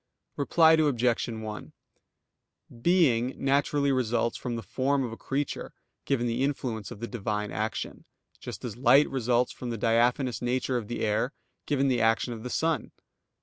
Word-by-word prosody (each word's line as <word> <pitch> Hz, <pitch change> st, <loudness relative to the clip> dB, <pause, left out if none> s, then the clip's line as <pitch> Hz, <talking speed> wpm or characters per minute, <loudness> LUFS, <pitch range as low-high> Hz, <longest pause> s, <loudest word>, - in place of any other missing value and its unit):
Reply 160 Hz, +3 st, +4 dB
Obj. 125 Hz, -7 st, +2 dB
1: 110 Hz, -2 st, -6 dB, 1.1 s
Being 130 Hz, -7 st, +3 dB
naturally 140 Hz, +1 st, +1 dB
results 120 Hz, -2 st, 0 dB
from 120 Hz, -2 st, -4 dB
the 115 Hz, -, -5 dB
form 135 Hz, +6 st, 0 dB
of 120 Hz, -, -4 dB
a -, -, -6 dB
creature, 140 Hz, +4 st, -4 dB, 0.3 s
given 130 Hz, -4 st, 0 dB
the 120 Hz, +1 st, -1 dB
influence 125 Hz, -6 st, -2 dB
of 105 Hz, -, -10 dB
the 115 Hz, -, -3 dB
Divine 105 Hz, -3 st, -3 dB
action; 110 Hz, +2 st, -4 dB, 0.3 s
just -, -, -7 dB
as 115 Hz, -, -5 dB
light 130 Hz, +4 st, +5 dB
results 125 Hz, -1 st, +1 dB
from 125 Hz, -, -7 dB
the 115 Hz, -, -3 dB
diaphanous 120 Hz, +3 st, +1 dB
nature 125 Hz, +1 st, 0 dB
of 115 Hz, -4 st, -4 dB
the 120 Hz, -, -4 dB
air, 110 Hz, +6 st, 0 dB, 0.3 s
given 140 Hz, -2 st, +2 dB
the 125 Hz, -3 st, +2 dB
action 115 Hz, +2 st, +2 dB
of 110 Hz, -, -8 dB
the 125 Hz, -, -5 dB
sun. 160 Hz, +4 st, -1 dB
125 Hz, 160 wpm, -28 LUFS, 115-135 Hz, 1.1 s, light